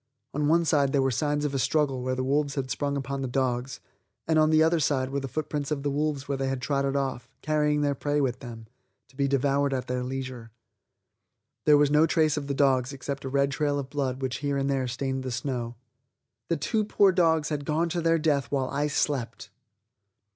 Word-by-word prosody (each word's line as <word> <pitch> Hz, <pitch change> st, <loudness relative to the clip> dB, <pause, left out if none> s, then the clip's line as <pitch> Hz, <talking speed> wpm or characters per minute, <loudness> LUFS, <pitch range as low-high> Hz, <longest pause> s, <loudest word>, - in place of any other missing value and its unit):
On 145 Hz, +1 st, 0 dB
one 170 Hz, +2 st, +3 dB
side 140 Hz, -3 st, +2 dB
there 140 Hz, -, +3 dB
were 135 Hz, -, +1 dB
signs 145 Hz, +4 st, 0 dB
of 145 Hz, -, -2 dB
a 135 Hz, -, 0 dB
struggle 135 Hz, -2 st, +1 dB
where 130 Hz, 0 st, -1 dB
the 130 Hz, -, -2 dB
wolves 140 Hz, +2 st, 0 dB
had 130 Hz, -2 st, -3 dB
sprung 140 Hz, -1 st, -1 dB
upon 135 Hz, 0 st, -3 dB
the 135 Hz, -, -2 dB
dogs, 125 Hz, 0 st, -1 dB, 0.5 s
and 160 Hz, -1 st, +3 dB
on 155 Hz, 0 st, +4 dB
the 155 Hz, 0 st, +5 dB
other 165 Hz, +1 st, +3 dB
sides 135 Hz, -3 st, 0 dB
were 140 Hz, -, -1 dB
the 135 Hz, -, -5 dB
footprints 150 Hz, +1 st, -3 dB
of 145 Hz, -3 st, -2 dB
the 145 Hz, -, 0 dB
wolves 145 Hz, -1 st, -1 dB
where 140 Hz, -1 st, -2 dB
they 135 Hz, 0 st, 0 dB
trotted 135 Hz, +2 st, -1 dB
off, 130 Hz, -3 st, -2 dB
carrying 150 Hz, -1 st, +1 dB
their 145 Hz, -1 st, +1 dB
prey 145 Hz, +2 st, -1 dB
with 130 Hz, -3 st, 0 dB
them, 115 Hz, -3 st, -9 dB, 0.4 s
to 130 Hz, -, -23 dB
be 140 Hz, 0 st, +1 dB
devoured 140 Hz, 0 st, +1 dB
at 130 Hz, -, -3 dB
their 125 Hz, 0 st, -2 dB
leisure. 130 Hz, -2 st, -5 dB, 1.2 s
There 150 Hz, -1 st, +7 dB
was 145 Hz, 0 st, +3 dB
no 150 Hz, +2 st, +5 dB
trace 155 Hz, -2 st, +2 dB
of 145 Hz, -2 st, -4 dB
the 140 Hz, -, -2 dB
dogs 135 Hz, -1 st, +2 dB
except 135 Hz, 0 st, -5 dB
a -, -, -3 dB
red 140 Hz, +1 st, +1 dB
trail 145 Hz, -1 st, 0 dB
of 135 Hz, -1 st, -5 dB
blood 135 Hz, -2 st, -2 dB
which 130 Hz, -1 st, -1 dB
here 140 Hz, -1 st, -1 dB
and 135 Hz, 0 st, 0 dB
there 135 Hz, -2 st, 0 dB
stained 130 Hz, +2 st, -2 dB
the 130 Hz, -, -4 dB
snow. 120 Hz, -1 st, -3 dB, 0.7 s
The 170 Hz, -, +1 dB
two 215 Hz, +9 st, 0 dB
poor 200 Hz, -2 st, +4 dB
dogs 165 Hz, -4 st, +2 dB
had 150 Hz, -2 st, -2 dB
gone 155 Hz, +4 st, 0 dB
to 170 Hz, +1 st, -2 dB
their 165 Hz, 0 st, +3 dB
death 145 Hz, -5 st, 0 dB
while 135 Hz, -2 st, 0 dB
I 145 Hz, +2 st, 0 dB
slept! 135 Hz, -4 st, -2 dB
140 Hz, 220 wpm, -27 LUFS, 130-150 Hz, 1.2 s, There